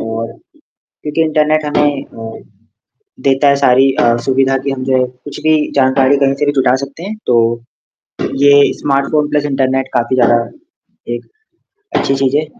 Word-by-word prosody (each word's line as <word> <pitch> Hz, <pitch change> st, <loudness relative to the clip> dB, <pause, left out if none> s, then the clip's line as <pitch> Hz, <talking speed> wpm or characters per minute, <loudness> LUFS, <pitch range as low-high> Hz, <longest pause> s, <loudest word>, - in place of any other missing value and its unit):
और 115 Hz, 0 st, -4 dB, 0.7 s
क्योंकि 150 Hz, +2 st, -1 dB
इंटरनेट 155 Hz, 0 st, +1 dB
हमें 145 Hz, -1 st, 0 dB
अ, 115 Hz, 0 st, -10 dB, 0.9 s
देता 135 Hz, +2 st, +3 dB
है 140 Hz, -, +4 dB
सारी 135 Hz, -1 st, +4 dB
अ, 120 Hz, 0 st, +3 dB
सुविधा 135 Hz, 0 st, +2 dB
कि 140 Hz, -, +1 dB
हम 130 Hz, -1 st, -5 dB
जो 130 Hz, -1 st, +1 dB
है 130 Hz, -, +2 dB
कुछ 125 Hz, +3 st, -11 dB
भी 155 Hz, 0 st, +3 dB, 0.2 s
जानकारी 135 Hz, 0 st, +3 dB
कहीं 135 Hz, -1 st, +2 dB
से 145 Hz, -, -2 dB
भी 145 Hz, -, +1 dB
जुटा 130 Hz, -1 st, +3 dB
सकते 140 Hz, +4 st, -13 dB
हैं, 205 Hz, +4 st, -6 dB
तो 115 Hz, -1 st, +2 dB, 0.8 s
ये 145 Hz, 0 st, +5 dB
स्मार्टफ़ोन 145 Hz, +1 st, 0 dB
प्लस 150 Hz, -1 st, 0 dB
इंटरनेट 135 Hz, -1 st, -1 dB
काफ़ी 120 Hz, +1 st, 0 dB
ज़्यादा 120 Hz, -1 st, +4 dB, 0.8 s
एक -, -, -9 dB, 0.7 s
अच्छी 135 Hz, -, 0 dB
चीज़ 135 Hz, 0 st, 0 dB
है। 155 Hz, +1 st, 0 dB
135 Hz, 160 wpm, -14 LUFS, 130-145 Hz, 0.9 s, ये